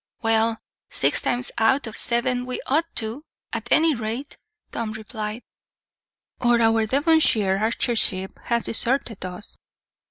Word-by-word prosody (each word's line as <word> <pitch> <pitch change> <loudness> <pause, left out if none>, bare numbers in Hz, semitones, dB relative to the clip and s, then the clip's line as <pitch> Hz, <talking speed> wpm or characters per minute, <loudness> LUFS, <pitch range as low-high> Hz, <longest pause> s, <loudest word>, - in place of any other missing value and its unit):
"Well, 225 0 +2 0.3
six - - +2
times 245 +1 +1
out 255 +5 +3
of 220 -1 -7
seven 245 +1 0
we 255 - -3
ought 315 +5 +1
to, 225 +5 -2 0.3
at - - -4
any 320 0 +5
rate," 235 +3 -5 0.4
Tom 225 -2 -3
replied; 220 0 -6 1.0
"or 240 -1 +3
our 225 -1 +3
Devonshire 260 - +3
archership 220 -3 +1
has 235 -1 0
deserted 235 -2 0
us." 185 +2 -8
230 Hz, 125 wpm, -23 LUFS, 220-255 Hz, 1.0 s, any